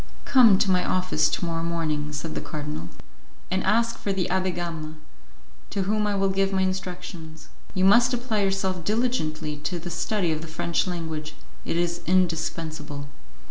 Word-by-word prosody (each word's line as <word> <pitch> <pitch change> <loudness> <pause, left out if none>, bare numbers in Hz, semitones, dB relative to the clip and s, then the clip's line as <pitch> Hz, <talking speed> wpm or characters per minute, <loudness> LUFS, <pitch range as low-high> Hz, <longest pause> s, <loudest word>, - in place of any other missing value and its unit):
"Come 235 -7 +7
to 195 - +2
my 180 -1 +3
office 185 -4 +2
to 175 - -1
morrow 165 -1 -1
morning," 155 -3 -1
said 150 +2 -4
the - - -3
cardinal, 150 - -5 0.6
"and 190 0 +1
ask 230 +3 +2
for 200 - -1
the 190 -2 0
Abbé 185 -1 +1
Gama, 165 -3 -4 0.7
to 195 - -1
whom 210 +2 +1
I 205 - 0
will 195 0 +2
give 195 0 +1
my 190 -1 +2
instructions. 180 -4 -5 0.3
You 185 0 +3
must 235 +5 +6
apply 240 -4 0
yourself 190 -2 0
diligently 160 -9 -1
to 160 +5 -3
the 175 +1 -6
study 175 +1 0
of 155 -1 -2
the 165 - -7
French 165 +3 0
language; 160 -3 -4 0.3
it - - -1
is 175 0 0
indispensable." 160 -5 0
175 Hz, 170 wpm, -25 LUFS, 160-195 Hz, 0.7 s, Come